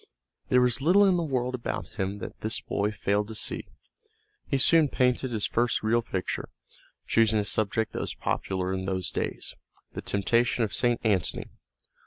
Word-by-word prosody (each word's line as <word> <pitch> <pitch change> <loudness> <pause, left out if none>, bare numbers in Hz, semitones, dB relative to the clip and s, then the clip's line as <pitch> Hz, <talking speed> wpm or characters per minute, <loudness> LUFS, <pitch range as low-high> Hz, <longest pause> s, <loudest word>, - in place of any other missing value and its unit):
There 125 - +5
was 125 +2 +1
little 185 +7 +5
in 190 -2 +4
the - - 0
world 130 -4 -1
about 125 -2 -3
him 95 +1 -1
that - - -8
this 110 +1 -2
boy 100 +1 -1
failed 105 0 0
to 110 - -7
see. - - -1 0.8
He 140 - +1
soon 155 +4 +5
painted 125 0 +1
his 110 -3 0
first 120 0 0
real 115 +2 +3
picture, 95 -5 -4 0.6
choosing 110 -1 +3
a 105 - +1
subject 110 +2 0
that - - -3
was - - -4
popular 95 -1 -2
in 95 0 -3
those 95 -2 -2
days, - - -3 0.4
the - - -5
temptation 115 +4 +1
of 105 - -2
St. 120 -1 +2
Antony. 100 -7 0
115 Hz, 175 wpm, -27 LUFS, 100-125 Hz, 0.8 s, There